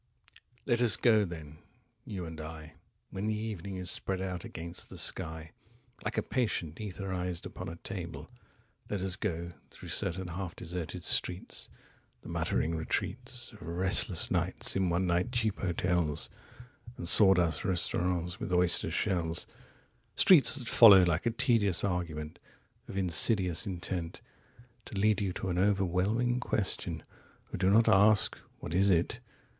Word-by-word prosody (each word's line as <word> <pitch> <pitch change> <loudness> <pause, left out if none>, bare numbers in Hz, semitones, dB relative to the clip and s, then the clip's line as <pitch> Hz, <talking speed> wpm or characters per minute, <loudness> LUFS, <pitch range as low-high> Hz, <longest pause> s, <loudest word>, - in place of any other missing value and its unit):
1Let 120 -2 +1
us 120 -3 +4
go 110 -4 +4
then, 80 -4 -9 0.5
you 95 -4 -6
and 80 -1 -8
I,2When 80 +5 -9
the 110 -1 -1
evening 100 -3 -5
is 90 -1 -2
spread 95 -1 -1
out 90 -2 -4
against 85 +1 -7
the - - -10
sky3Like 90 +10 -5
a - - +1
patient 90 - -2
etherized 95 -4 -4
upon - - -7
a 85 - -7
table;4Let 90 +2 -9
us 95 -1 -1
go, 85 -5 -4 0.2
through - - -12
certain 90 +1 -1
half 90 0 -5
deserted 85 -1 -6
streets,5The 90 0 -3
muttering 80 - -1
retreats6Of 120 +3 -4
restless 90 +2 +3
nights - - -1
in 95 -2 +1
one 85 +2 0
night 90 +6 0
cheap 110 -4 0
hotels7And 90 - -4
sawdust 90 -5 +5
restaurants 90 -1 0
with - - -5
oyster 90 -1 +2
shells:8Streets 95 - +1
that 125 -4 -7
follow 100 -5 +8
like 85 +4 0
a - - +4
tedious 115 -5 +2
argument9Of 85 -3 -6
insidious 95 +1 +3
intent10To 95 +6 -8
lead 105 0 +2
you 95 -2 -1
to 95 - -4
an 90 0 -1
overwhelming 100 +5 +1
question 105 -5 -2 0.5
...11Oh, - - -2
do 95 0 +2
not 110 +3 +4
ask, 105 0 +4 0.2
"What 75 - -7
is 95 +3 +3
it?" 85 -3 +1
95 Hz, 130 wpm, -30 LUFS, 85-105 Hz, 0.5 s, follow